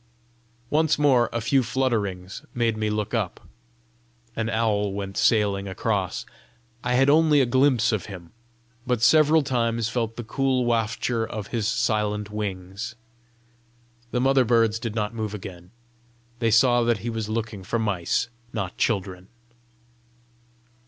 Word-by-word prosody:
Once 155 0 +2
more 135 -5 +3
a 115 - -1
few 130 +4 +2
flutterings 110 -8 -2
made 115 -2 +1
me 110 0 -1
look 105 +1 -2
up: 105 -7 -1 1.0
an 110 0 -2
owl 105 -3 0
went 100 -1 -5
sailing 100 -3 +2
across. 95 -2 -2 0.6
I 125 0 0
had 135 +2 +4
only 150 0 +5
a 135 - +4
glimpse 125 -2 +3
of 105 -6 -2
him, 90 -5 -10 0.6
but 125 -3 0
several 155 +4 +5
times 115 -4 0
felt 115 -2 -2
the 120 - -6
cool 130 +2 0
wafture 115 0 0
of 110 -2 -6
his 110 -3 -1
silent 105 -3 0
wings. 100 +2 -5 1.1
The 125 - -1
mother 135 0 +4
birds 115 -2 +2
did 115 -1 -5
not 105 0 -1
move 110 -2 -4
again; 90 -3 -9 0.7
they 115 -1 +2
saw 120 +2 +4
that 120 -1 +2
he 120 - -1
was 110 -2 -4
looking 110 -3 -3
for 115 - -2
mice, 100 -7 0 0.2
not 95 -5 -4
children. 95 -4 -1
115 Hz, 140 wpm, -24 LUFS, 105-120 Hz, 1.1 s, only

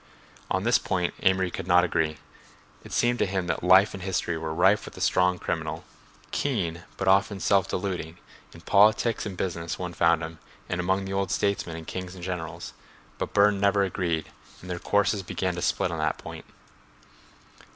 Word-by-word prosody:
On 95 +1 0
this 120 +2 +4
point 90 -2 -1
Amory 95 -2 +2
could 85 - -6
not 90 0 +5
agree. 80 -3 0 0.7
It - - -12
seemed 120 +1 +1
to - - +2
him 95 -1 -1
that 85 - -2
life 95 +3 +6
and 95 - -7
history 90 -2 -1
were 80 -1 -4
rife 95 +6 +3
with - - -10
the - - -10
strong 90 0 +2
criminal, - - -3 0.5
keen, 90 - -2
but 95 - -3
often 100 +1 +3
self 95 0 +2
deluding; 90 -4 -3 0.3
in 85 - -14
politics 105 +4 +3
and 95 -3 -7
business 85 -3 -3
one 90 -1 -5
found 85 -1 +3
him 80 0 -7 0.3
and 90 0 -2
among 95 +2 0
the 95 - -4
old 95 0 0
statesmen 100 -5 -1
and 80 - -8
kings 95 +1 -6
and 90 - -10
generals; 90 -3 -5 0.5
but - - -4
Burne 100 -1 +4
never 100 0 +3
agreed 85 -4 -2 0.3
and 90 - -8
their 90 - -3
courses 105 +1 +1
began 95 0 -2
to 90 - -5
split 90 - 0
on 85 - -4
that 80 0 0
point. - - -9
90 Hz, 185 wpm, -26 LUFS, 85-100 Hz, 0.7 s, life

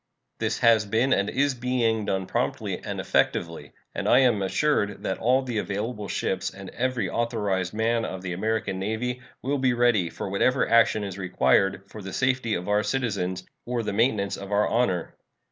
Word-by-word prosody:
This - - -1
has 115 -2 +5
been 115 +6 +2
and 100 0 +1
is 140 +2 +1
being 120 -3 0
done 95 -1 -1
promptly - - -2
and - - -4
effectively, 80 -4 -1 0.2
and - - -2
I - - +6
am 120 -6 +3
assured 105 +1 0
that 95 - -2
all 130 +3 +3
the 120 -4 -2
available 105 +1 -3
ships - - -1
and - - -10
every 130 -6 -1
authorized 105 -5 -1
man 115 +1 +1
of 95 -3 -5
the 90 -1 -3
American 100 0 -1
Navy 115 +5 -2 0.2
will 140 +2 0
be 130 -1 +2
ready 120 -7 +2
for - - -6
whatever 100 +6 +2
action 115 -2 +4
is 100 -1 -6
required 95 +2 +2
for 105 +2 -10
the 95 -1 -7
safety 130 -4 +1
of 90 +1 -4
our 105 0 +3
citizens 105 -6 -2 0.2
or 120 -1 -2
the 105 - -3
maintenance 105 -3 +1
of 100 +1 -8
our 105 +1 +3
honor. 95 -8 0
110 Hz, 180 wpm, -26 LUFS, 95-120 Hz, 0.2 s, I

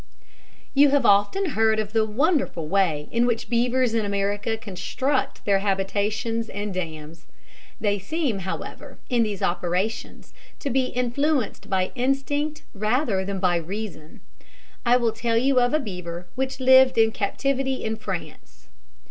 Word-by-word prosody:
You 285 +1 +6
have 280 -3 +2
often 205 - +3
heard 220 -2 +2
of 215 0 -3
the 220 -1 +3
wonderful 270 - 0
way 160 -5 +1
in 235 +1 +2
which 235 0 -2
beavers 245 0 +2
in 225 -1 +1
America 205 +2 -1
construct 250 +7 -2
their 200 -1 +3
habitations 205 +3 -1
and 205 0 -4
dams. 160 -2 -6 0.5
They 205 -1 0
seem, 260 - -2
however, 190 0 -6
in 240 -1 +3
these 210 -4 -1
operations, 180 +5 -2 0.2
to 280 - -3
be 260 +1 +2
influenced 250 +1 -1
by 185 -1 0
instinct 275 +4 -1
rather 215 -1 0
than 195 0 -3
by 180 -2 +2
reason. 170 -3 -6 0.7
I 245 +1 +6
will 235 -2 +1
tell 230 +1 0
you 260 +2 +3
of 245 0 +2
a 305 - +2
beaver 180 - -6
which 265 +1 -3
lived 260 0 +6
in 225 0 +5
captivity 265 +6 -1
in 220 0 -1
France. 190 - -8
220 Hz, 145 wpm, -24 LUFS, 195-255 Hz, 0.7 s, You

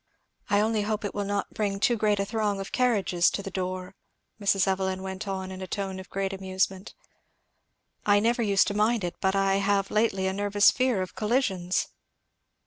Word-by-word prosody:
"I 205 0 +4
only 220 0 +1
hope 210 0 -2
it 205 - -3
will 205 0 -2
not 200 0 -2
bring 200 -2 -1
too 240 +4 +3
great 210 -2 +1
a 200 - +1
throng 210 -2 -1
of 195 - -6
carriages 200 -8 +2
to 200 - -4
the 195 - -6
door," 185 0 -4 0.5
Mrs. 195 -1 +2
Evelyn 190 0 -1
went 190 +2 -5
on 190 -1 -4
in 190 0 -8
a 185 - -5
tone 190 0 -4
of 190 - -10
great 195 0 -2
internal 190 0 -7
amusement; 190 +1 -1 1.1
"I 205 0 +4
never 235 +3 +1
used 200 -3 +3
to - - -3
mind 215 +1 +2
it, 175 - -2
but 190 0 +1
I 195 0 +2
have 200 0 +1
lately 210 -3 +1
a 190 - 0
nervous 205 +1 +4
fear 250 -7 +1
of 185 - -9
collisions." 210 -6 0
195 Hz, 200 wpm, -27 LUFS, 190-210 Hz, 1.1 s, I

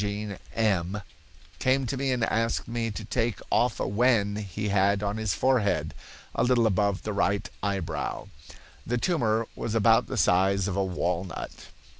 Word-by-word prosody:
came 130 +1 +2
to 130 - -2
me 135 0 0
and 125 -2 0
asked 115 0 0
me 115 -1 -2
to 105 0 -6
take 115 +1 -1
off 120 -1 +2
a - - -1
wen 105 -1 +2
he 105 +1 -4
had 100 +1 +2
on 100 +1 -1
his 110 -2 -1
forehead, 125 -6 +1 0.4
a - - +1
little 125 -2 +3
above 100 -1 +1
the 105 - -3
right 100 0 0
eyebrow. 95 -7 -3 0.6
The 120 - -1
tumor 115 -7 +1
was 115 - -3
about 115 +1 +4
the 130 - -4
size 95 0 +3
of 95 - -2
a 100 - +1
walnut. 90 0 -3
105 Hz, 155 wpm, -27 LUFS, 100-115 Hz, 0.6 s, about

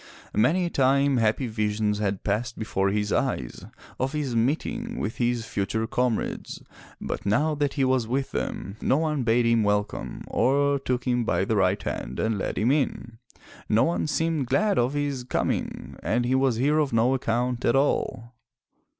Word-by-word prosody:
Many 175 +11 +3
a - - -1
time 140 0 +3
happy 115 +3 +1
visions 105 -2 -1
had 100 -2 -1
passed 115 +4 -1
before 100 -3 0
his 105 +1 -1
eyes - - -2 0.3
of 130 +3 -1
his 145 -5 -2
meeting 230 - -1
with 115 - -3
his 120 -1 0
future 110 -2 -2
com 125 0 +1
rades, - - -5 0.4
but - - -4
now 145 +11 +2
that 145 -1 -1
he 140 - +1
was 130 -3 +2
with 135 +3 -1
them, 100 +2 -4
no 135 - +2
one 155 -3 0
bade 120 0 +2
him 115 -1 +3
welcome, 105 0 -1
or 140 +2 +2
took 125 -2 -2
him 125 -2 +1
by 100 - +1
the 110 - 0
right 95 -2 +2
hand 65 - -4
and 110 -2 0
led - - -3
him 115 +4 +2
in; 125 -5 -1 0.5
no 110 +2 +4
one 170 -1 0
seemed 160 -3 0
glad 205 - +2
of 125 +3 +1
his 145 -3 -2
coming 125 - -2
and 120 +2 0
he 125 - +1
was 130 -2 +2
here 145 +6 +2
of 150 -3 +1
no 115 +3 +3
account 125 -1 -1
at 120 - +3
all. 125 -3 0
125 Hz, 180 wpm, -26 LUFS, 110-140 Hz, 0.5 s, no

